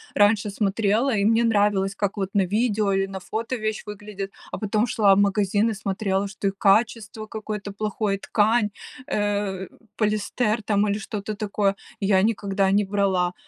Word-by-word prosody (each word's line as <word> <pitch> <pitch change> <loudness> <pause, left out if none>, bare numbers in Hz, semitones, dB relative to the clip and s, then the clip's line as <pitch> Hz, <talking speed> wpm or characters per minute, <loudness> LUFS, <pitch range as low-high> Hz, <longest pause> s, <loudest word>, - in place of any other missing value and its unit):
раньше 205 0 +3
смотрела, 215 +5 +1
и 200 -1 +1
мне 225 +2 +4
нравилось, 205 -3 +2
как 200 0 -2
вот 195 -1 -1
на 195 - +4
видео 210 -1 +1
или 195 0 +1
на 195 0 -6
фото 225 +7 -3
вещь 215 -1 -3
выглядит, 205 -1 -6 0.2
а - - -3
потом 215 +2 0
шла 205 -3 +4
в - - +2
магазин 205 +2 +2
и 225 - -1
смотрела, 195 0 -1
что 200 0 -3
и - - +1
качество 215 +1 +1
какое-то 215 -2 -5
плохое, 210 -1 -1
ткань, 215 +2 +2 0.4
э, 205 -2 -1 0.3
полиэстер 215 +1 0
там 205 0 +2
или 200 - 0
что-то 215 -1 -5
такое 200 -1 0 0.2
я 195 -1 +3
никогда 200 -3 +1
не 205 +1 +3
брала. 190 -3 +1
205 Hz, 165 wpm, -24 LUFS, 195-215 Hz, 0.4 s, мне